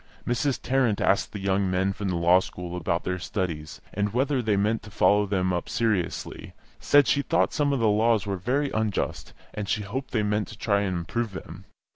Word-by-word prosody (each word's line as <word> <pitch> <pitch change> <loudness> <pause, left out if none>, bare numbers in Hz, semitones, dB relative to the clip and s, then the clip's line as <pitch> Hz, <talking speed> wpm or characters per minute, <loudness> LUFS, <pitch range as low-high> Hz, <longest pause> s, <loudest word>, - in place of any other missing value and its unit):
Mrs. 125 +3 0
Tarrant 125 -5 +1
asked 100 - +2
the 105 - -6
young 95 0 +1
men 95 +1 +1
from 100 0 -4
the 90 - -1
Law 85 +2 +5
School 90 -1 -7
about 85 0 -1
their 90 0 -2
studies, 85 -5 -4
and 105 +1 -1
whether 130 +3 +1
they 110 -3 +1
meant 105 +3 +1
to 105 - -12
follow 100 +2 +3
them 95 -2 0
up 85 - -3
seriously; 110 -7 -2 0.3
said 145 -1 +5
she 140 - +3
thought 165 +3 +1
some 145 -2 +1
of 140 - 0
the 115 - +3
laws 110 0 +3
were 100 -1 -2
very 135 +9 0
unjust, 110 -2 -2 0.2
and 105 -2 -4
she 105 - 0
hoped 130 +7 -5
they 110 -3 0
meant 105 0 0
to 110 - -11
try 100 -2 +1
and 95 -3 -1
improve 100 +6 -3
them. 95 - -9
105 Hz, 210 wpm, -26 LUFS, 95-115 Hz, 0.3 s, Law